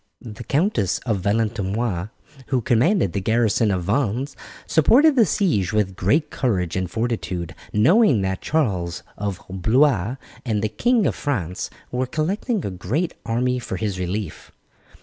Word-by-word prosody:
The 115 -1 -9
Count 160 - +1
of 100 +1 -1
Valentinois, 105 -1 -1 0.4
who 125 +2 +1
commanded 120 - +2
the 100 - -1
garrison 110 +1 +2
of 95 -3 0
Vannes, 130 +6 -1 0.3
supported 270 - +5
the 230 -6 +5
siege 150 - +1
with 100 -3 0
great 125 - +1
courage 95 - -1
and 95 -1 -1
fortitude, 95 -6 -3 0.2
knowing 140 - +4
that 95 0 -2
Charles 95 - -1
of 100 -3 -3
Blois 110 +3 +2 0.3
and 110 -4 -1
the 110 - +1
King 235 - +2
of 115 - +2
France 95 - -3 0.2
were 125 +1 -1
collecting 190 - -1
a 100 - -3
great 115 - -2
army 125 +2 0
for 125 - -5
his 100 -4 -3
relief. 90 0 -4
110 Hz, 145 wpm, -22 LUFS, 95-140 Hz, 0.4 s, supported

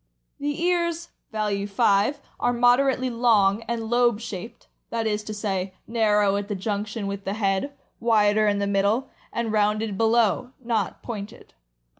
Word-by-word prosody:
The 290 +1 -2
ears 340 -1 0 0.2
(value 205 -2 -1
5) 200 +7 +2 0.2
are 245 - +1
moderately 255 +2 +3
long 225 -4 +3
and 230 -1 -2
lobe 240 -2 +3
shaped 225 -2 -8
— - - -50
that 230 -1 -2
is 210 -1 -1
to - - -5
say, 195 -3 -3
narrow 210 -3 +2
at 205 0 -3
the 205 - -3
junction 205 +2 -3
with 200 0 -4
the 195 +1 -3
head, 200 +6 0 0.3
wider 215 -2 +3
in 205 -1 +2
the 200 - 0
middle, 200 +5 +1 0.2
and 235 -2 -2
rounded 210 -1 +1
below, 230 +2 +2
not 230 -5 -2
pointed. 210 -4 -8
215 Hz, 155 wpm, -24 LUFS, 200-235 Hz, 0.3 s, moderately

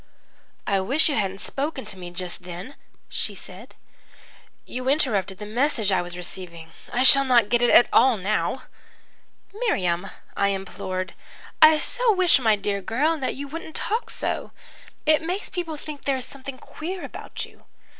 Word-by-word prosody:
"'I 200 -1 +2
wish 275 - +2
you 290 - 0
hadn't 195 -2 -1
spoken 280 -1 -3
to - - -3
me 180 -2 -8
just 175 +1 -5
then,' 180 +8 -8 0.3
she - - -3
said. - - -12 0.9
'You 255 +1 -3
interrupted 210 - +1
the 210 - -7
message 225 -1 +1
I 185 -2 +3
was 175 0 -6
receiving. 170 -2 -7 0.2
I 245 +1 +2
shall 275 +1 +7
not 240 -5 +4
get 240 +1 +3
it 240 - +5
at 240 - +7
all 255 -3 +6
now.' 200 +3 -1 0.9
"'Miriam,' 195 - 0 0.3
I 200 - +2
implored. 190 -1 -3 0.5
'I 310 0 +9
so - - +3
wish 365 -6 +4
my 220 -4 +4
dear 200 0 -2
girl, 275 - +1
that 265 - -2
you 280 +1 -5
wouldn't 320 +2 -8
talk 450 +3 -1
so. - - -2 0.6
It 310 0 +4
makes 360 +5 -3
people 335 -4 -4
think 295 -1 -8
there 275 -1 +1
is 255 - -5
something 275 -1 -8
queer 355 +7 -6
about - - -6
you. - - -20
245 Hz, 165 wpm, -24 LUFS, 195-300 Hz, 0.9 s, I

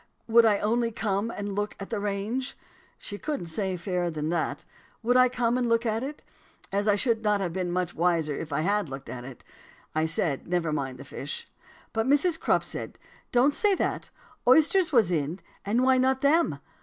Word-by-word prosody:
would 230 0 +6
I 210 -2 +4
only 230 +3 +1
come 215 -1 -1
and 205 -3 -4
look 205 +1 -2
at 195 - -8
the 220 - -1
range? 210 +6 -3 0.4
She 205 -1 -7
couldn't 295 - -3
say 185 +2 -2
fairer 180 0 -1
than 155 -1 -3
that. 170 -1 -2 0.4
Would 245 +2 +2
I 255 0 +6
come 245 0 +1
and 245 -2 0
look 230 +1 +2
at 225 0 0
it?' 290 +3 -6 0.5
As 200 +2 0
I 205 - +5
should 225 +1 +1
not 210 -2 +2
have 180 -4 -2
been 180 -1 -2
much 180 -1 -1
the - - -16
wiser 165 -3 +2
if 155 +2 -6
I 140 - 0
had 200 -1 0
looked 135 0 -8
at 125 -1 -6
it 130 -2 -11 0.5
I 155 +1 +1
said 160 -3 0
never 170 -3 0
mind 135 -3 -4
fish. 145 - -6 0.5
But 225 +1 0
Mrs. 315 +4 +3
Crupp - - +2
said, - - -6 0.3
'Don't 255 +4 +4
say 410 +3 +2
that; - - -2 0.4
oysters 320 +6 +5
was 225 - +4
in, 160 +2 -1 0.2
and 225 +5 +1
why 260 0 +4
not 260 +1 +2
them?' 320 +4 +3
205 Hz, 200 wpm, -27 LUFS, 175-245 Hz, 0.5 s, would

